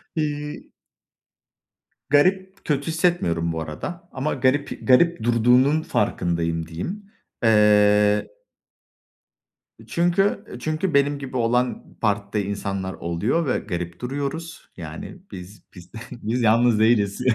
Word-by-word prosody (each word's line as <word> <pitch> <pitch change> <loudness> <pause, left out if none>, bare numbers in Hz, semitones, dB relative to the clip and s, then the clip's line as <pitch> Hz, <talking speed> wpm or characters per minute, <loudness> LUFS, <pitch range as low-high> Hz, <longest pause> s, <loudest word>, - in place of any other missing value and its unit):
İii 150 -1 -3 1.4
Garip 190 +6 +2
kötü 145 0 -1
hissetmiyorum 160 - 0
bu 80 0 -3
arada. 170 - -7
Ama 140 +3 -2
garip 140 +2 -1
garip 130 0 +4
durduğunun 125 +6 +3
farkındayım 85 - -1
diyeyim. 195 - -6 0.3
Eee 105 -1 +4 1.6
Çünkü 195 +5 +1
çünkü 155 +5 -2
benim 140 0 +2
gibi 130 -2 -5
olan, 125 +2 -1
partide 100 -1 0
insanlar 100 -2 -3
oluyor 105 - -1
ve - - +1
garip 85 -3 -5
duruyoruz. 145 +6 -5
Yani, 80 - -8
biz 90 +1 -10
biz 90 0 -13 0.2
biz 120 +1 -3
yalnız 115 0 +4
değiliz. 110 -1 +2
120 Hz, 105 wpm, -23 LUFS, 100-155 Hz, 1.6 s, garip